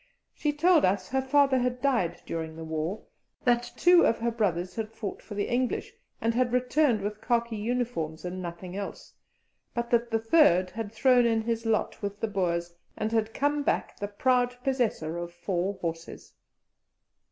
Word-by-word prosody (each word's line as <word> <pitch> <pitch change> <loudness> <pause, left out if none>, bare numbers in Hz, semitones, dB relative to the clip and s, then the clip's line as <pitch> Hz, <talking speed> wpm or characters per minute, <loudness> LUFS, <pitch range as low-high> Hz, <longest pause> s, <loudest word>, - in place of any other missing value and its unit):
She 300 - -1
told 325 +2 +4
us 185 0 +1
her 265 +1 +1
father 270 0 +3
had 250 0 -1
died 235 -11 0
during 160 -1 -4
the 165 - -7
war, 160 +5 -3 0.4
that 240 -1 +2
two 355 0 +6
of 230 - +3
her 235 +1 -1
brothers 180 -5 -1
had 220 0 -4
fought 220 -3 -6
for 205 - -9
the 205 - -1
English, 250 +1 -1 0.3
and 230 0 +1
had 245 0 +1
returned 250 -2 +2
with 210 +1 -4
khaki 235 -1 0
uniforms 210 -8 -2
and 185 +1 -4
nothing 175 +1 -7
else, 200 0 -6 0.6
but 235 0 -2
that 235 0 +2
the 225 - +2
third 220 - +4
had 220 -2 -5
thrown 245 +1 +4
in 225 -1 +1
his 230 0 -2
lot 220 -1 0
with 205 0 -4
the 225 - -1
Boers, 175 -4 -1 0.2
and 215 +1 -1
had 225 -1 +1
come 290 +1 +1
back - - -1
the 205 - -2
proud 250 +4 +1
possessor 220 -11 -1
of 175 0 -5
four 180 +2 -2
horses. 165 -1 -6
225 Hz, 175 wpm, -28 LUFS, 185-250 Hz, 0.6 s, two